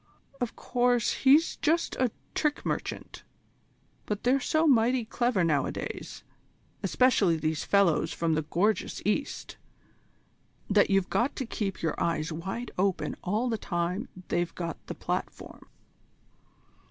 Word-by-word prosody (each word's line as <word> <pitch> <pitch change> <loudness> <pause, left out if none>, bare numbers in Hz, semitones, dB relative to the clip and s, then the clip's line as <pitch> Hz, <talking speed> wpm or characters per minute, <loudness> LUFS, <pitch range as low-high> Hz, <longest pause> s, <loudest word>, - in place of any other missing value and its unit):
"Of 245 -2 -2
course 245 -2 +1
he's 285 +5 +4
just 330 +2 +1
a 255 -1 +2 0.2
trick 300 -2 0
merchant, - - -4 0.8
but 210 -1 -3
they're 255 +3 +3
so 315 +4 +1
mighty 245 -3 +3
clever 240 -4 +1
nowadays, 150 -5 -2 0.6
especially 215 -10 +3
these 155 -1 -1
fellows 195 -6 +3
from 165 -1 0
the 155 - +1
gorgeous 185 +8 0
East, 245 +7 -2 1.1
that 205 0 +4
you've 195 -1 +2
got 250 +5 +1
to 265 - -3
keep 195 -6 -4
your 160 - +1
eyes 160 -1 0
wide 195 +9 -5
open 185 -6 0
all 215 +7 0
the 225 -3 -1
time 175 +4 -2 0.2
they've 175 -1 -1
got 170 -1 -5
the - - -5
platform." - - -5
210 Hz, 130 wpm, -28 LUFS, 170-245 Hz, 1.1 s, he's